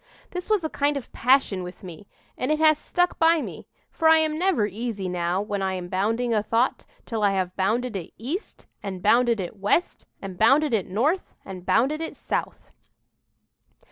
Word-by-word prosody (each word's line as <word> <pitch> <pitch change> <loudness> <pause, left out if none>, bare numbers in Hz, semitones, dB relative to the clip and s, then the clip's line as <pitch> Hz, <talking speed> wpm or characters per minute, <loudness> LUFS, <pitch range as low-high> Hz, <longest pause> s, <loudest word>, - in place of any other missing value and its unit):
"This 360 +2 -6
was 425 -5 +2
a 315 - -1
kind 290 0 +1
of 270 - -6
a - - -30
passion 250 -7 +2
with 180 +2 -9
me, 185 +2 -10 0.3
and 255 - -2
it 305 - +2
has 310 -1 +4
stuck 355 0 0
by 330 0 +5
me; - - -7 0.2
for 325 - +1
I 320 - +7
am 315 -1 +1
never 360 - +2
easy 210 -1 -4
now 180 +2 -1
when 205 -1 -3
I 190 -1 -1
am 180 -1 -6
bounding 225 +6 0
a 215 - +2
thought, 230 +4 0 0.2
till 225 -3 -3
I 200 -1 +3
have 185 -1 -2
bounded 225 +5 0
it 180 -4 -5
east, 295 - -6 0.2
and 190 -3 -6
bounded 235 +1 +4
it 185 +2 -5
west, 205 - 0
and 190 -2 -8
bounded 275 +5 +4
it 205 -5 0
north, 275 - -1
and 185 -2 -9
bounded 280 +7 +2
it 325 - -5
south." - - -4
225 Hz, 195 wpm, -25 LUFS, 195-300 Hz, 0.3 s, I